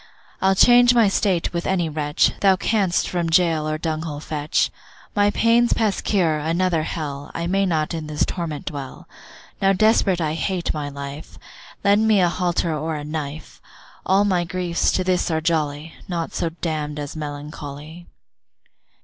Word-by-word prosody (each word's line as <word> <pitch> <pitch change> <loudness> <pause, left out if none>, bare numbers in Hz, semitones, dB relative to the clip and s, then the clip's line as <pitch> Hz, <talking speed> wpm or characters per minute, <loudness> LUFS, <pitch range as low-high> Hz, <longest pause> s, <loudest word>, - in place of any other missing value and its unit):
I'll 190 0 +3
change 245 +3 +6
my 230 -3 +5
state 195 -4 0
with 170 0 -2
any 180 -3 +1
wretch, 150 -1 +1
Thou 195 -1 +5
canst 195 -2 +1
from 175 -2 -1
gaol 165 -2 +2
or 155 0 -1
dunghill 155 -2 -3
fetch; 150 0 -1 0.4
My 205 0 +4
pain's 230 +3 +3
past 215 -4 0
cure, 165 -7 +1
another 165 +2 0
hell, 145 -3 -5
I 170 - -2
may 195 +2 +1
not 155 -2 0
in 160 -2 -4
this 150 -1 0
torment 165 -5 -4
dwell! 140 -3 -7 0.5
Now 195 0 +4
desperate 200 -3 +3
I 155 -2 -1
hate 175 +2 -2
my 150 -2 -4
life, 140 +1 -8 0.5
Lend 205 +2 +4
me 215 -2 +4
a 175 -2 +4
halter 175 -2 -1
or 155 +1 -3
a 150 - -5
knife; 150 0 -6 0.4
All 195 +2 +3
my 185 -3 +1
griefs 175 0 0
to 185 - +1
this 180 -1 0
are 160 -1 +1
jolly, 155 -1 -1
Naught 170 -2 -3
so 165 - -1
damn'd 155 -3 -4
as 145 0 -5
melancholy. 150 +2 -8
165 Hz, 165 wpm, -22 LUFS, 155-185 Hz, 0.5 s, change